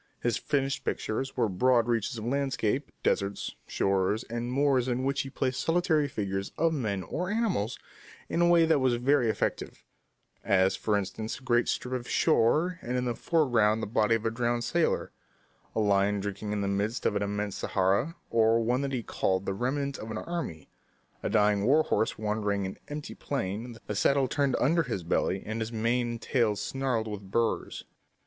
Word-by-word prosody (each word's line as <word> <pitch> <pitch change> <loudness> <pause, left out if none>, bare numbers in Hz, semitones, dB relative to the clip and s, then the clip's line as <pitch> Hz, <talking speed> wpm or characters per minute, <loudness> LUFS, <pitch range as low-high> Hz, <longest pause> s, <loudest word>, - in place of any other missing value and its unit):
His 120 -3 0
finished 135 +1 -1
pictures 135 +5 -3
were 120 -3 +3
broad 115 +5 +3
reaches 115 -1 0
of 110 - -5
landscape, 135 -1 -1
deserts, 100 0 0
shores, 100 +3 +1
and 120 +1 -4
moors 135 -2 +2
in 125 0 -1
which 140 +1 +1
he 135 - -6
placed 130 -1 -1
solitary 165 -3 +2
figures 100 -5 -3
of 165 +1 +2
men 105 -10 -2
or 180 - -3
animals 205 - 0 0.5
in 170 - 0
a 175 - +5
way 170 -1 +6
that 160 -2 +3
was 130 -2 +2
very 125 0 +2
effective - - -2 0.6
as, 95 0 +3
for 105 -2 0
instance, 110 +3 -4
a 130 - -16
great 120 -2 +2
strip 125 - -2
of 125 -2 -4
shore 165 +10 +2
and 125 +1 -2
in 125 - -1
the 120 - 0
foreground 115 -9 +2
the - - 0
body 110 +1 +2
of 115 - -3
a 115 - +1
drowned 120 0 0
sailor; 170 +7 0 0.6
a - - +1
lion 100 -1 +2
drinking 100 +1 -4
in 105 -1 -1
the 100 - -1
midst 100 +4 -1
of 105 - +2
an 100 - 0
immense 105 0 -2
Sahara; 100 - +1 0.2
or, 115 0 +4
one 120 +3 +1
that 140 -1 -2
he 120 -3 -2
called 95 -2 -1
"The 95 - -1
Remnant 140 +6 -2
of 110 - -7
an 110 - -4
Army," 165 - -5 0.5
a - - -2
dying 105 -1 +3
war 145 +8 +4
horse 110 - 0
wandering 105 -1 -1
on 95 -1 -2
an - - -14
empty 150 0 -6
plain, 115 -2 -4
the - - -3
saddle 135 +5 +3
turned 140 -1 +1
under 165 +6 +3
his 120 - -3
belly, 90 +3 0
his 110 +1 -4
mane 120 +2 0
and 115 - -7
tail 115 -6 +2
snarled 125 -1 -1
with 100 -2 -7
burrs. 115 +3 -1
115 Hz, 190 wpm, -29 LUFS, 105-135 Hz, 0.6 s, way